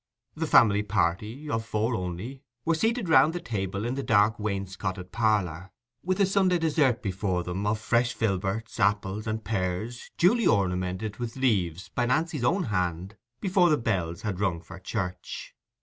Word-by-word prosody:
The 160 +1 -3
family 105 -7 +5
party 105 - -1
(of 115 -6 -1
four 110 +2 -1
only) 95 +7 -4 0.2
were 165 - +3
seated 225 +5 0
round 160 -1 +5
the 175 - -3
table 100 - -3
in 120 - -1
the 140 - -2
dark 105 -1 +3
wainscoted 95 -2 -4
parlour, 100 -6 0 0.3
with 185 +1 -1
the 200 - +4
Sunday 190 -2 +3
dessert 150 -7 +2
before 95 -2 -1
them, 95 +4 -3
of 110 +1 +1
fresh 120 +2 +1
filberts, 105 +1 -2
apples, 105 +1 +1
and 110 0 -2
pears, 105 +3 -3
duly 225 +7 +4
ornamented 95 +2 0
with 120 -2 -5
leaves 95 -10 0
by 120 -1 -1
Nancy's 155 +1 0
own 180 +10 +2
hand 90 -1 -2 0.2
before 185 -2 +3
the 150 - +4
bells 90 -8 -2
had 100 -4 -3
rung 95 -5 0
for 90 +3 -11
church. 90 -2 -5
110 Hz, 165 wpm, -27 LUFS, 95-130 Hz, 0.3 s, family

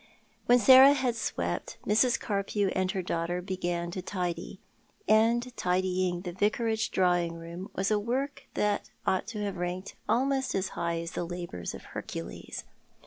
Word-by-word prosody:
When 245 - +7
Sarah 260 +4 +9
had 260 -4 0
swept, 85 - -3
Mrs. 225 +4 +3
Carpew 200 -1 -1
and 185 0 0
her 190 -1 -2
daughter 170 +1 -1
began 175 -2 -2
to 185 - -4
tidy; 180 0 -4 0.5
and 235 +3 +3
tidying 180 -1 0
the 180 -1 -5
Vicarage 220 +4 0
drawing 175 -2 +2
room 170 +3 -8
was 195 +2 0
a 210 - +3
work 260 +6 -3
that 210 -1 0 0.2
ought 190 +1 +1
to 215 -3 -4
have 200 -2 -3
ranked 180 +2 -4 0.2
almost 265 +1 +1
as 190 -1 0
high 170 0 -2
as 170 +1 -5
the 175 - -3
labours 170 - -5
of - - -10
Hercules. 60 - -6
190 Hz, 155 wpm, -29 LUFS, 175-220 Hz, 0.5 s, Sarah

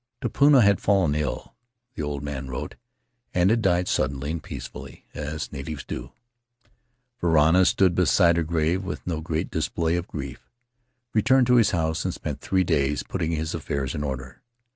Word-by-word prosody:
Tupuna 140 +2 +4
had 100 -1 +3
fallen 95 -7 +3
ill 75 -2 -3 0.4
(the - - -5
old 75 -1 -3
man 70 -2 -5
wrote) 60 - -5 0.6
and 90 +2 +4
had 115 0 +2
died 90 -3 +2
suddenly 70 +2 -1
and 85 -1 -3
peacefully, - - -9
as 75 +1 -5
natives 75 +1 -6
do. - - -6 1.1
Varana 85 +2 +4
stood 95 -2 +3
beside 85 0 +4
her 85 - +1
grave 80 +3 0
with 90 - -6
no 80 -3 -2
great 80 +2 -3
display 80 +1 -1
o£ 85 - -15
grief, 70 -4 -7 0.6
returned 130 +4 +4
to 125 0 +4
his 110 -4 +5
house 80 -3 -1
and - - -2
spent - - -5
three 95 -1 +1
days 75 -4 0
putting 85 -3 -2
his 80 0 -2
affairs 65 -3 -3
in 75 - -3
order. 65 -2 -6
80 Hz, 165 wpm, -25 LUFS, 75-95 Hz, 1.1 s, his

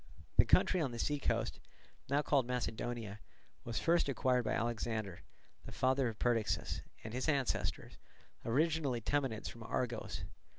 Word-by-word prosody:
The - - +8
country 185 - +4
on 145 - +1
the 120 - -5
sea 145 +4 0
coast, - - 0 0.5
now 145 +2 +3
called 135 -5 +3
Macedonia, 120 -3 -3 0.4
was 120 - -4
first 170 -3 +3
acquired 125 -2 +2
by 105 - +1
Alexander, 110 -4 -2 0.4
the - - -7
father 130 0 +2
of 110 -2 -4
Perdiccas, 115 -3 0 0.2
and 110 - -6
his 130 +5 0
ancestors, 140 -4 0 0.5
originally 145 0 +1
Temenids 130 -3 0
from 115 - -8
Argos. 110 -7 -2
120 Hz, 140 wpm, -35 LUFS, 115-140 Hz, 0.5 s, The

